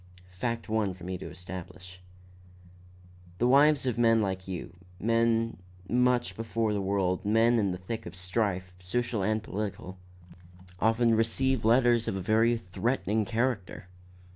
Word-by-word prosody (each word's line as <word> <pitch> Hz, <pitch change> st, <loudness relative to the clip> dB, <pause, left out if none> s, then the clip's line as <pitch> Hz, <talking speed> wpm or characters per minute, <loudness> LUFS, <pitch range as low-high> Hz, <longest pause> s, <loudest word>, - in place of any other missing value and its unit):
Fact 115 Hz, +5 st, -3 dB
one 110 Hz, -4 st, 0 dB
for 90 Hz, -, -14 dB
me 95 Hz, +1 st, -4 dB
to -, -, -7 dB
establish. 90 Hz, +1 st, -10 dB, 1.4 s
"The 120 Hz, -, +2 dB
wives 145 Hz, +2 st, +5 dB
of 125 Hz, -2 st, -1 dB
men 115 Hz, -1 st, +5 dB
like 95 Hz, -3 st, -2 dB
you 90 Hz, -1 st, -6 dB, 0.2 s
men 115 Hz, 0 st, +1 dB, 0.3 s
much 125 Hz, -5 st, +2 dB
before 115 Hz, 0 st, -1 dB
the 100 Hz, -, -1 dB
world, 95 Hz, -2 st, 0 dB
men 115 Hz, +3 st, +3 dB
in 100 Hz, -3 st, +1 dB
the 90 Hz, -, -4 dB
thick 95 Hz, +4 st, -6 dB
of 85 Hz, -, -9 dB
strife, 90 Hz, 0 st, -2 dB
social 115 Hz, +4 st, -2 dB
and 110 Hz, +2 st, 0 dB
political 100 Hz, -3 st, -5 dB, 0.8 s
often 115 Hz, +2 st, +3 dB
receive 115 Hz, +3 st, +1 dB
letters 120 Hz, 0 st, +4 dB
of -, -, -1 dB
a -, -, -2 dB
very 115 Hz, +4 st, +3 dB
threatening 110 Hz, +1 st, -1 dB
character." 110 Hz, -6 st, -2 dB
110 Hz, 140 wpm, -29 LUFS, 95-115 Hz, 1.4 s, wives